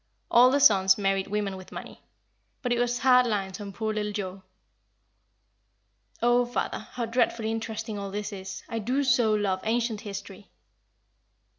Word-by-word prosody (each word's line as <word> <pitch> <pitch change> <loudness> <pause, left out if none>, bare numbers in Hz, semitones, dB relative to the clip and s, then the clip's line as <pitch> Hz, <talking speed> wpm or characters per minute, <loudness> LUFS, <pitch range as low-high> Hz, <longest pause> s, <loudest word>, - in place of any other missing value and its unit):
All 245 +2 +7
the 280 +2 +2
sons 190 -6 +6
married 195 -1 0
women 205 -1 -2
with 185 -1 -11
money. - - -9 0.6
But 245 -1 +1
it 240 - 0
was 245 0 +1
hard 250 -1 +5
lines 195 -3 -2
on 200 -1 -6
poor 220 +2 -3
little 210 -1 -2
Joa." 195 -2 -5 1.8
"Oh, 240 +1 +4
father, 245 0 -3
how 240 -2 -2
dreadfully 230 -1 0
interesting 225 -1 -4
all 200 0 -5
this 205 +1 -4
is! 190 -1 -7
I 230 - -3
do 255 +6 0
so 235 -4 +3
love 195 -3 0
ancient 225 -1 -1
history." 200 -1 -8
215 Hz, 155 wpm, -27 LUFS, 200-240 Hz, 1.8 s, All